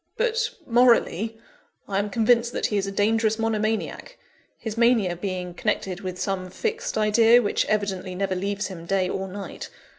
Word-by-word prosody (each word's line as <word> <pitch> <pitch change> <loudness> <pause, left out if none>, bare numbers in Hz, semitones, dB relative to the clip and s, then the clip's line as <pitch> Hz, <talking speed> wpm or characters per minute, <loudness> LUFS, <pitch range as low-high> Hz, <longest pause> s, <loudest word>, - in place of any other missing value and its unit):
But, 460 0 +1 0.2
morally, 230 -3 +3 0.5
I 195 -1 0
am 205 +1 -1
convinced 235 +2 +2
that - - -1
he 210 - 0
is 195 0 -1
a - - -3
dangerous 220 +2 +2
monomaniac; 220 -1 -2 0.4
his 220 -2 -5
mania 230 -6 +3
being 180 -1 -4
connected 190 -1 -2
with 185 -1 -5
some 185 -2 -2
fixed 455 - -3
idea 225 +2 +5
which 215 - 0
evidently 195 -3 -1
never 195 0 -1
leaves 200 +2 -2
him 170 -3 -7
day 190 -1 +1
or 190 +1 -3
night. 195 +1 -7
210 Hz, 160 wpm, -24 LUFS, 190-225 Hz, 0.5 s, idea